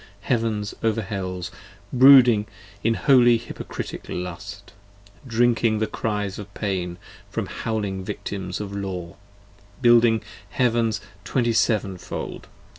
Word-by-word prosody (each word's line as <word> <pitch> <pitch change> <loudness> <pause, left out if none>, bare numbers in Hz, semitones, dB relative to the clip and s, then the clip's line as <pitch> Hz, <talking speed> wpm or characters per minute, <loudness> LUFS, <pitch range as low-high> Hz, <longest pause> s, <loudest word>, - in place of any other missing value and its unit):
Heavens 110 -2 -1
over 110 -1 0
Hells 95 -3 -4 0.4
Brooding 125 -5 +7 0.4
in 115 +1 +2
holy 120 -3 +5
hypocritic 115 - -7
lust, 95 +2 -6 0.5
drinking 115 -1 +2
the 110 - +1
cries 105 -3 -3
of 100 -1 -9
pain 90 -4 -2 0.3
From - - -3
howling 100 -4 -3
victims 95 -1 -5
of 100 -1 -5
Law: 90 -4 -5 0.6
building 120 -2 +5 0.3
Heavens 115 -4 +1 0.2
Twenty 120 +3 0
seven 105 -5 +1
fold. - - -6
105 Hz, 110 wpm, -24 LUFS, 95-115 Hz, 0.6 s, Brooding